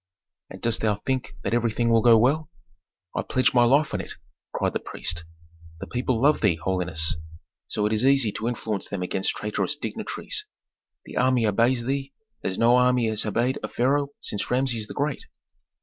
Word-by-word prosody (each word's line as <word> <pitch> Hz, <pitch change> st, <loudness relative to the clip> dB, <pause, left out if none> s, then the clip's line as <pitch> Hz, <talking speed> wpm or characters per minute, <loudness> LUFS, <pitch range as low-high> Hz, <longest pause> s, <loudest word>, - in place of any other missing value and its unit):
"And -, -, -11 dB
dost 115 Hz, -1 st, +1 dB
thou 105 Hz, -2 st, +2 dB
think 130 Hz, -1 st, -2 dB
that -, -, -1 dB
everything 115 Hz, 0 st, +1 dB
will 115 Hz, -1 st, +5 dB
go 115 Hz, -1 st, +7 dB
well?" 140 Hz, +7 st, +2 dB, 0.7 s
"I -, -, +1 dB
pledge 130 Hz, -, +1 dB
my 120 Hz, -1 st, +5 dB
life 140 Hz, +5 st, +3 dB
on -, -, -1 dB
it!" -, -, -9 dB, 0.4 s
cried -, -, -1 dB
the -, -, -1 dB
priest. 85 Hz, 0 st, -4 dB, 0.5 s
"The -, -, -5 dB
people 125 Hz, -1 st, -1 dB
love 145 Hz, +4 st, +3 dB
thee, 100 Hz, -6 st, +3 dB
holiness, 80 Hz, -3 st, -1 dB, 0.5 s
so 105 Hz, -, -1 dB
it 105 Hz, -, +1 dB
is 110 Hz, +2 st, +1 dB
easy 135 Hz, -5 st, +4 dB
to 110 Hz, -, -4 dB
influence 110 Hz, -4 st, -3 dB
them 100 Hz, -3 st, -4 dB
against 95 Hz, +1 st, -1 dB
traitorous 105 Hz, 0 st, -1 dB
dignitaries. -, -, -5 dB, 0.6 s
The -, -, -8 dB
army 125 Hz, -2 st, +3 dB
obeys 115 Hz, +4 st, +2 dB
thee 135 Hz, +2 st, -2 dB, 0.3 s
as 95 Hz, -, -2 dB
no 120 Hz, +2 st, +5 dB
army 125 Hz, -2 st, +3 dB
has 110 Hz, 0 st, 0 dB
obeyed 120 Hz, +5 st, 0 dB
a -, -, -3 dB
pharaoh 140 Hz, +4 st, +1 dB
since 105 Hz, -, -3 dB
Rameses 125 Hz, -4 st, 0 dB
the -, -, -9 dB
Great. 145 Hz, -1 st, -2 dB
120 Hz, 180 wpm, -25 LUFS, 105-130 Hz, 0.7 s, go